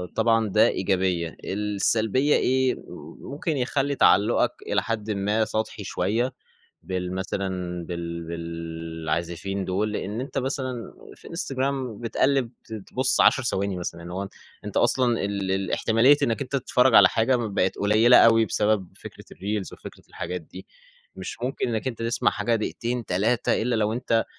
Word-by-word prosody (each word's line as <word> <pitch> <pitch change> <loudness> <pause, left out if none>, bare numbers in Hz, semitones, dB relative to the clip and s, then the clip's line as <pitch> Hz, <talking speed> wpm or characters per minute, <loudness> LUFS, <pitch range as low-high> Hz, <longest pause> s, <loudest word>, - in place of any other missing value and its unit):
طبعًا 115 -2 +2
ده - - +5
إيجابية، 90 -3 0
السلبية 105 +6 +1
إيه؟ 130 0 +2 0.5
ممكن 150 +1 -3
يخلّي 135 +2 0
تعلقُك 100 -3 +4 0.2
إلى - - +1
حدٍ 110 -1 -3
ما 105 +2 +1
سطحي 110 -1 -3
شوية 110 +8 -1 0.5
بالمثلًا 95 +1 -3 0.4
بال 85 -1 -5
بالعازفين 85 +2 -4
دول، 105 +3 -1
لأن 105 +2 -3
أنت 135 - -4
مثلًا 130 -3 -3 0.2
في - - -13
Instagram 130 -4 -3
بتقلب 125 +1 +1
ت - - -14
تبُص 120 +5 0
10 130 - +5
ثواني 100 -5 -1
مثلًا. 85 -1 -5
يعني 85 +1 -8
هو 100 +1 -4 0.4
أنت - - -7
أصلًا 120 -3 +2
ال 100 0 -2
ال 95 -1 -2
الاحتمالية 115 +7 +3
إنك 115 +4 +1
أنت 135 0 -10
تتفرج 125 -1 +2
على - - +9
حاجة 120 +3 +2
بقت 105 -5 -1
قليلة 110 +4 +5
أوي 115 -1 +6
بسبب 105 -4 0
فكرة - - -11
الreels 100 0 -3
وفكرة - - -11
الحاجات 90 0 -5
دي، 80 - -12 0.5
مش - - -6
ممكن 125 0 -1
إنك 115 +1 -2
أنت 115 -2 -6
تسمع 115 0 +1
حاجة 105 +3 0
دقيقتين 120 +2 -2
3 110 +7 +1
إلا 120 +2 0
لو 110 0 +1
أنت 115 -1 +1
110 Hz, 150 wpm, -25 LUFS, 95-125 Hz, 0.5 s, على